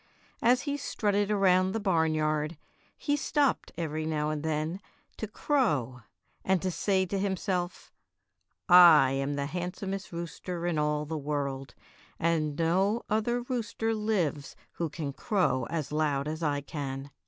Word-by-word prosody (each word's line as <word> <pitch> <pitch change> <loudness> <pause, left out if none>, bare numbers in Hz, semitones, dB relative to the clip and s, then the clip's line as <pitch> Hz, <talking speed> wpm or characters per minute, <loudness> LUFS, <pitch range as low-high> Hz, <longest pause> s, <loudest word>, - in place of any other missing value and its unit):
As 250 +2 +4
he 285 -1 -2
strutted 205 -7 0
around 190 -2 +3
the 225 - -1
barnyard 155 -4 +1 0.4
he 290 - 0
stopped 290 -1 0
every 155 -2 -2
now 155 -1 -1
and 150 -1 -3
then 160 +4 -2 0.4
to 220 - -4
crow 150 - 0 0.4
and 190 -1 +2
to 185 - 0
say 190 +1 +1
to 195 +2 -2
himself, 190 -2 -2 0.8
'T 180 - +3
am 145 -5 +7
the 140 0 -1
handsomest 185 +4 -4
rooster 170 +1 -5
in 170 -3 0
all 150 0 0
the 155 +1 -4
world, 140 -2 -3 0.4
and 155 -3 0
no 190 +7 +1
other 240 +3 +1
rooster 235 -2 -2
hves 190 -10 -1 0.2
who 165 -2 -3
can 145 -2 -5
crow 180 - 0
as 155 -4 -3
loud 150 -2 0
as 155 +2 -4
I 145 -3 0
can." 140 -2 -5
170 Hz, 140 wpm, -29 LUFS, 150-200 Hz, 0.8 s, am